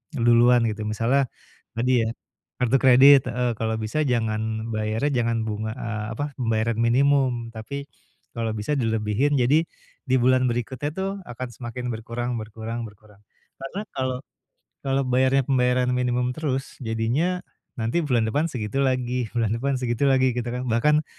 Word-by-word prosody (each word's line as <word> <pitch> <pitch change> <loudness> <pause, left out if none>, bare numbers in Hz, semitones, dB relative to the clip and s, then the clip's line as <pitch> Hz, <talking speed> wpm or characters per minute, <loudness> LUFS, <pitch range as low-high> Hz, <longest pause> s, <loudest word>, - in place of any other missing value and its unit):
duluan 120 0 +5
gitu. 105 0 -5
Misalnya 120 +5 +1 0.5
tadi 125 0 +3
ya, 110 - -1 0.5
kartu 125 +2 +2
kredit 135 +1 +7
heeh, 125 -1 0
kalau 110 0 -1
bisa 110 +8 -1
jangan 110 -2 -1
bayarnya 115 +5 0
jangan 115 -1 -1
bunga, 110 0 -3
eee, 110 -3 -4
apa, 145 -1 -3
pembayaran 115 -2 0
minimum, 120 0 +2
tapi 140 +6 -6 0.5
kalau 115 -1 -2
bisa 105 +8 -2
dilebihin, 115 +2 +1
jadi, 135 +5 +4 0.5
di 130 - +4
bulan 130 0 +3
berikutnya 125 +4 -3
tuh 190 0 -1
akan 130 -5 -7
semakin 120 +1 -6
berkurang 115 +2 -4
berkurang 110 +2 -6
berkurang. 105 -2 -13 0.3
Karena 180 +11 -6
kalau 130 -1 -1 0.6
kalau 135 0 0
bayarnya 130 +1 +2
pembayaran 125 -1 +2
minimum 125 0 0
terus 135 -2 -4
jadinya 130 +11 -1 0.3
nanti 115 +8 0
bulan 125 -8 +1
depan 145 +9 0
segitu 125 -1 -3
lagi, 125 -2 0
bulan 115 -3 +1
depan 135 +4 0
segitu 125 +2 0
lagi 130 -1 +3
gitu 120 0 -3
kan. 125 +1 -3
Bahkan 150 +6 +2
125 Hz, 145 wpm, -24 LUFS, 115-135 Hz, 0.6 s, kredit